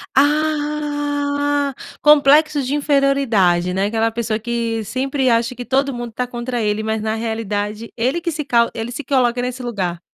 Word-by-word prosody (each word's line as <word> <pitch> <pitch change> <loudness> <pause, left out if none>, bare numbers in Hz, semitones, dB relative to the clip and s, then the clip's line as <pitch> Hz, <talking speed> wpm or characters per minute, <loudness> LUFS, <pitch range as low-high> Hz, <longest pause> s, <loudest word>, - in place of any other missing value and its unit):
Ah, 290 -1 0 0.3
complexo 295 +1 +5
de 265 +2 -1
inferioridade, 275 - +2
né? 190 +2 +1
Aquela 225 +1 0
pessoa 225 -1 -2
que 230 0 -2
sempre 265 +4 -1
acha 235 +1 +2
que 245 +1 -7
todo 275 +2 +1
mundo 240 -2 -6
tá 250 +3 -3
contra 240 0 -4
ele, 210 0 0
mas, 220 0 -1
na 220 0 -1
realidade, 220 -1 -3
ele 260 +9 0
que 340 - -2
se 300 -1 -4
cau 235 -3 +3
ele 225 +1 -4
se 295 - -5
coloca 250 -3 +1
nesse 250 +1 -4
lugar. 190 -8 -3
245 Hz, 165 wpm, -19 LUFS, 225-285 Hz, 0.3 s, complexo